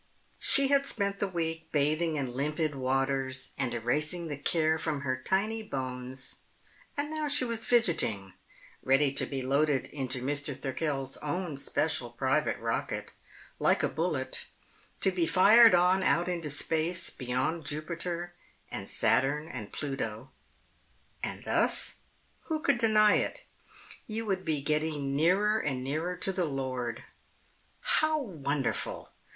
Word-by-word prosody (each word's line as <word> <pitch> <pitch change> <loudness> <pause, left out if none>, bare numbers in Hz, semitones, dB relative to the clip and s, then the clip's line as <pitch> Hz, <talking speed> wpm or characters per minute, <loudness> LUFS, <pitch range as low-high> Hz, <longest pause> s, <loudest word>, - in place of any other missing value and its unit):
She 275 -1 +4
had 280 0 +3
spent 200 -2 -1
the 200 - 0
week 165 -3 -3
bathing 155 +3 +1
in 135 -4 -2
limpid 150 +3 -1
waters 135 0 -1
and 130 -3 -1
erasing 150 +9 0
the 145 - -2
care 160 +2 +2
from 150 -3 -2
her 130 -2 0
tiny 200 +11 0
bones, 130 -6 -5 0.6
and 290 +1 -1
now 310 -1 -2
she 285 -3 +2
was 230 -2 -3
fidgeting, 135 - +1 0.5
ready 135 +1 +3
to 140 - 0
be 135 -2 -4
loaded 140 +1 +2
into 135 -3 -2
Mr. 140 0 -1
Thirkell's 135 0 -2
own 160 +1 -3
special 140 -2 0
private 130 +3 0
rocket, - - -3 0.5
like - - +3
a - - +4
bullet, - - -2 0.5
to 190 - +4
be 175 -3 +1
fired 215 +4 +7
on 180 +2 +4
out 175 -2 +2
into 170 -4 -2
space 165 +4 0
beyond 130 +6 -2
Jupiter 170 +4 -4 0.4
and - - -5
Saturn 150 +3 +1
and 120 -9 -7
Pluto. 135 -5 -4 0.9
And - - -5
thus - - +2 0.5
who 315 -1 -1
could 280 -6 +2
deny 215 -2 +5
it? - - -3 0.6
you 225 +1 -3
would 190 -3 -1
be 150 -3 -1
getting 150 -2 0
nearer 195 +8 +3
and 130 -7 -2
nearer 160 +7 -2
to 190 - 0
the 180 -2 0
Lord. 130 -5 -3 0.8
How 310 0 +3
wonderful! 145 - -2
155 Hz, 135 wpm, -30 LUFS, 135-185 Hz, 0.9 s, fired